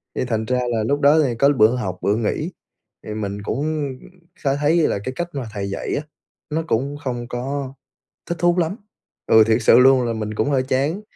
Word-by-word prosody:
thì - - -1
thành 110 -2 -1
ra 125 +2 0
là 110 -2 0
lúc 145 +6 0
đó 145 +2 +5
thì 125 -4 -1
có 140 - +5
bữa 120 -4 +4
học 95 -8 -3
bữa 100 - +1
nghỉ. 120 - -2 0.5
Thì 105 - -5
mình 105 -1 -4
cũng 150 +5 -2 0.5
khá 135 -2 -1
thấy 150 +3 +2
là - - -1
cái 130 - -4
cách 175 +3 -3
mà 135 -3 -4
thầy 100 -2 -3
dạy 100 - -3
á, - - -1 0.5
nó 160 +2 -1
cũng 140 +6 -1
không 120 -2 -3
có 135 +2 -4 0.5
thích 170 - -4
thú 175 +1 +3
lắm. 170 +2 0 0.5
Ừ, 110 0 +7
thiệt 110 -1 +4
sự 115 +1 +6
luôn 130 0 +6
là 115 - -1
mình 110 -1 -4
cũng 110 - 0
hơi 135 -3 +2
chán, 140 +9 -1
130 Hz, 215 wpm, -21 LUFS, 110-145 Hz, 0.5 s, Ừ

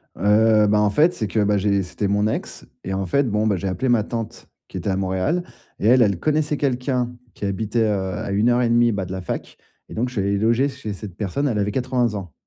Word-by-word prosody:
Heu, 105 +2 +4
bah, 105 +1 +3
en 105 -1 +3
fait, 155 - +3
c'est 110 - -3
que, 110 +3 -1
bah, 105 0 +2
j'ai 100 0 +1
c'était 95 +2 -3
mon 105 +1 +1
ex 110 - -4 0.2
et 95 - -4
en 95 0 -2
fait, 140 +11 +2
bon, 105 +1 +1
bah, 105 - +2
j'ai 95 +2 -3
appelé 125 +8 -1
ma 115 -3 +3
tante 115 -1 -6 0.2
qui - - -7
était - - -3
à 95 - +1
Montréal 95 - -1 0.4
et 105 - +1
elle, 125 +1 +6
elle 100 -5 +1
connaissait 150 - 0
quelqu'un 125 -2 -1 0.2
qui 100 - -6
habitait, 110 +4 -1
heu, 95 -3 -1
à 105 -1 -4
1 105 +4 +2
heure 120 0 +3
et 120 - +1
demie, 120 0 +4
bah, 100 -3 -2
de 90 - -9
la 95 0 -4
fac 90 - -6 0.3
et - - -9
donc, 120 +3 0
je - - -13
suis 105 - -1
allé 100 +1 0
loger 115 +6 +2
chez 130 -6 -6
cette 100 -2 -9
personne. 110 +8 -2
Elle 110 -6 0
avait 105 0 0
80 125 -1 0
ans. 90 -6 -7
105 Hz, 260 wpm, -22 LUFS, 100-120 Hz, 0.4 s, elle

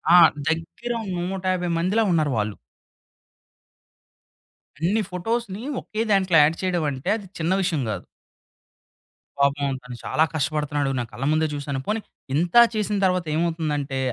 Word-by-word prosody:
ఆ! - - +10 0.3
దెగ్గిర 165 +9 -2 0.2
150 185 0 -1
మందిలా 195 +7 +2
ఉన్నారు 155 -4 +2
వాళ్ళు. 105 -1 -1 2.2
అన్ని 200 +7 +1
ఫోటోస్‌ని 215 +3 -3 0.2
ఒకే 215 +1 -4
దాంట్లో 190 -4 +4
యాడ్ 160 +3 +2
చేయడం 180 -3 0
అంటే 135 +7 -4
అది 205 -4 -7
చిన్న 165 +3 0
విషయం 165 -6 0
గాదు. - - -4 1.3
పాపం 140 0 +2
తను 125 -1 -8
చాలా 155 - +2
కష్టపడుతున్నాడు. 145 -2 0
నా 120 - 0
కళ్ళ 125 +5 -4
ముందే 155 0 +2
జూశాను. 140 -1 -3
పోనీ 215 +1 0 0.4
ఇంత 170 +5 0 0.2
చేసిన 210 -1 0
తరువాత 180 -2 +1
ఏమవుతుందంటే 155 -4 -1
165 Hz, 125 wpm, -24 LUFS, 145-190 Hz, 2.2 s, ఆ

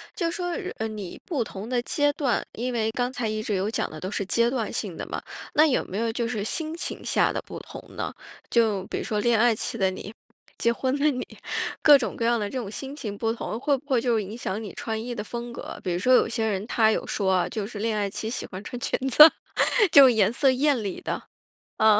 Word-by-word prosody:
就 335 -4 0
说， 355 +1 -3 0.3
呃， 220 - -2
你 210 -4 -7
不 300 - -1
同 205 -1 -8
的 245 0 0
阶 290 +3 +1
段 265 -6 0
因 250 +3 -3
为 225 -2 0
刚 245 +2 -1
才 245 -3 -3
一 215 0 -2
直 215 -2 -2
有 195 +3 0
讲 - - -1
的 155 - -9
都 185 - -5
是 205 - -1
阶 235 +3 +3
段 240 -4 -2
性 195 -6 -3
的 - - -5
嘛。 - - -4 0.3
那 305 +2 +7
有 275 - +2
没 190 - -6
有 230 +1 0
就 235 0 -2
是 220 -3 -2
心 315 +8 -2
情 - - -4
下 - - +2
的 - - -2
不 - - -7
同 - - -10
呢？ - - -3 0.4
就 215 -5 +2
比 - - -4
如 - - -4
说 210 -1 -1
恋 235 0 +3
爱 235 0 +4
期 215 - -3
的 195 -4 +2
你， 190 +3 -7 0.5
结 235 - +3
婚 260 +3 -1
的 300 - +4
你， 255 -3 -3 0.6
各 295 -2 +8
种 260 - -3
各 - - -3
样 235 0 +3
的 205 - -1
这 260 - -5
种 215 -5 -5
心 270 +6 -6
情 210 -8 -5
不 225 +1 0
同， 225 -1 -5
会 280 +2 +2
不 280 - -17
会 255 -3 +3
就 235 -2 +1
影 210 +3 -6
响 210 -3 -3
你 210 -4 -7
穿 220 -1 -3
衣 240 0 -5
的 210 - -4
风 235 +2 -6
格。 - - -7
比 185 - -2
如 175 - 0
说 255 +6 +3
有 - - +5
些 225 -1 -1
人， 205 -1 -1
她 220 -2 +3
有 - - -1
说 195 -2 0
啊， 180 -1 +1
就 215 -3 -3
是 210 0 -7
恋 220 0 0
爱 205 -1 0
期 220 +3 -4
喜 240 - -3
欢 190 +1 -8
穿 245 - -6
裙 - - 0
子， 300 +5 +10 0.6
就 275 -2 +10
颜 220 -3 +3
色 265 +2 +3
艳 265 -2 +2
丽 195 -2 -4
的。 - - -4 0.5
啊。 215 -1 +5
230 Hz, 275 characters per minute, -25 LUFS, 210-250 Hz, 0.6 s, 子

